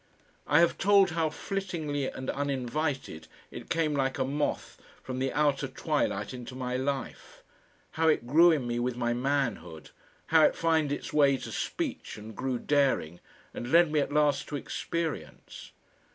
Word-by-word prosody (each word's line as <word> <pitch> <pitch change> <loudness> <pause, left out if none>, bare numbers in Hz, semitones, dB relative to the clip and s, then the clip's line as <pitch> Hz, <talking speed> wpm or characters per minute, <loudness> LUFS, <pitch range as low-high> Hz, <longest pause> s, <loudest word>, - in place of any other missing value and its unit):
I 145 +4 +5
have 170 - +2
told 200 -1 +5
how 160 -1 0
flittingly 160 -4 -3
and 130 - -4
uninvited 135 - -3 0.2
it - - -9
came 160 -2 +1
like 135 -2 0
a 130 - 0
moth 145 +2 -3 0.2
from 130 0 -5
the 135 0 0
outer 145 -2 +1
twilight 130 - -2
into 125 0 -8
my 125 -1 -3
life, 135 +1 -4 0.5
how 160 0 +1
it 155 -6 +2
grew 160 +8 +6
in 150 -7 +1
me 120 0 -2
with 125 0 -2
my 120 -1 0
manhood, 120 - -2 0.4
how 160 - +7
it - - +4
found 160 -3 +1
its 145 - -4
way 140 -2 +4
to - - -8
speech - - -4
and 110 +1 -10
grew 130 -1 -2
daring, 130 - +1 0.3
and 120 - -6
led 170 -1 +5
me 155 - +2
at 145 - -1
last 145 -1 +2
to 150 - -5
experience. 165 +3 -5
140 Hz, 165 wpm, -29 LUFS, 130-155 Hz, 0.5 s, how